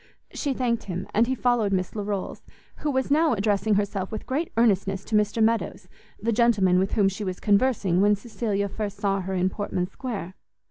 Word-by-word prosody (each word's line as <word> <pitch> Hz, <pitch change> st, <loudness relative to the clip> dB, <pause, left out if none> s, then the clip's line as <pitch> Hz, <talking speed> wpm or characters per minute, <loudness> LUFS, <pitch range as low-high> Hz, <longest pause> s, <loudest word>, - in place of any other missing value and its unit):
She 280 Hz, -3 st, -2 dB
thanked 240 Hz, -2 st, -1 dB
him, 185 Hz, 0 st, -4 dB
and 230 Hz, +3 st, +3 dB
he 260 Hz, -, 0 dB
followed 240 Hz, -5 st, +1 dB
Miss 185 Hz, -2 st, 0 dB
Larolles; 205 Hz, -2 st, -3 dB, 0.4 s
who 300 Hz, -, -2 dB
was 265 Hz, -1 st, -1 dB
now 310 Hz, 0 st, +4 dB
addressing 210 Hz, 0 st, +1 dB
herself 200 Hz, -2 st, -1 dB
with 215 Hz, -, -5 dB
great 300 Hz, +6 st, -2 dB
earnestness 195 Hz, -4 st, +2 dB
to 220 Hz, -, -2 dB
Mr 210 Hz, +1 st, +2 dB
Meadows, 225 Hz, +1 st, 0 dB, 0.3 s
the 230 Hz, -, 0 dB
gentleman 210 Hz, -6 st, +3 dB
with 190 Hz, +1 st, -1 dB
whom 205 Hz, -3 st, +3 dB
she 195 Hz, +2 st, -3 dB
was 185 Hz, -2 st, -4 dB
conversing 200 Hz, -4 st, +2 dB
when 205 Hz, +1 st, +4 dB
Cecilia 205 Hz, -2 st, -2 dB
first 205 Hz, 0 st, -5 dB
saw 195 Hz, -1 st, 0 dB
her 190 Hz, +1 st, -3 dB
in 185 Hz, +1 st, +1 dB
Portman 185 Hz, -3 st, -2 dB
Square. 200 Hz, -3 st, -6 dB
205 Hz, 190 wpm, -25 LUFS, 195-235 Hz, 0.4 s, now